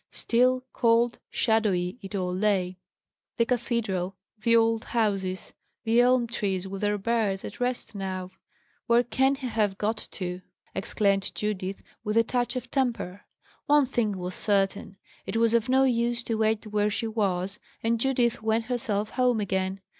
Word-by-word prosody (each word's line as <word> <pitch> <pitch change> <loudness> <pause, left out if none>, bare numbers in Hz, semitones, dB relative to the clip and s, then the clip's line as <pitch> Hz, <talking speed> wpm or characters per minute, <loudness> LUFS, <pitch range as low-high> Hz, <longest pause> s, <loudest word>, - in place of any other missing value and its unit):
Still, 255 +2 +2
cold, 235 0 +3
shadowy 210 -3 +1
it 195 0 -7
all 180 -2 -1
lay; 185 -2 0 0.6
the 230 - +3
cathedral, 225 -6 -1 0.2
the 230 +2 +3
old 225 -1 +3
houses, 195 -5 -1 0.3
the 230 +1 +4
elm 250 0 +4
trees 195 -5 -2
with 195 0 -6
their 205 0 +1
birds, 205 -2 0
at - - -8
rest 245 -2 -2
now. 185 -2 -4 0.6
"Where 235 0 +5
can 265 +4 +2
he 270 -1 -7
have 215 -5 0
got 215 +2 0 0.2
to?" 180 -1 -4 0.3
exclaimed 195 0 0
Judith, 195 -2 -3 0.2
with 210 +1 -1
a 230 - +6
touch 245 +2 -1
of 255 -1 -5
temper. 235 -8 -1 0.4
One 290 -1 +5
thing 225 -6 -1
was 180 0 -4
certain: 195 -1 0 0.3
it - - -2
was 230 0 +3
of 235 0 +2
no 265 +1 +5
use 240 -2 +1
to 230 - -2
wait 220 0 +1
where 210 0 +1
she 220 +2 -2
was, 200 -3 -1 0.2
and 230 0 +1
Judith 245 -2 +1
went 220 +1 +1
herself 220 -4 -1
home 250 -3 +2
again. 190 -1 -1
220 Hz, 160 wpm, -27 LUFS, 195-235 Hz, 0.6 s, a